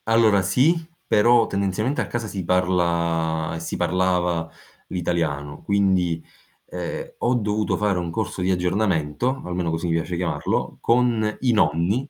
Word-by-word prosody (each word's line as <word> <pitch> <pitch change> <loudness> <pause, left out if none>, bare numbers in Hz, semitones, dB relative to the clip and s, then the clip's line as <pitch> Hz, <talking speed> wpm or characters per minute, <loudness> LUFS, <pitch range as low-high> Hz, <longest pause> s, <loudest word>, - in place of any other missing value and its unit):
Allora 110 -3 +4
sì, 130 - +3 0.3
però 115 +2 +4
tendenzialmente 100 +8 -1
a - - -3
casa 120 -1 -3
si 100 -3 -5
parla 85 -3 0
si 80 - -5
parlava 90 -1 0 0.4
l'italiano. 80 -5 -2
Quindi, 95 -5 +1 0.5
ehm, 90 -1 -5
ho 125 +1 +2
dovuto 105 -2 0
fare 105 -3 +1
un 85 -1 -3
corso 95 +1 -3
di 90 - 0
aggiornamento, 90 - 0
almeno 90 -1 -2
così 80 +1 -2
mi 85 - 0
piace 85 +2 -1
chiamarlo, 85 -1 -2
con 115 -3 +2
i 125 - +3
nonni 105 - +1
90 Hz, 140 wpm, -23 LUFS, 85-110 Hz, 0.5 s, Allora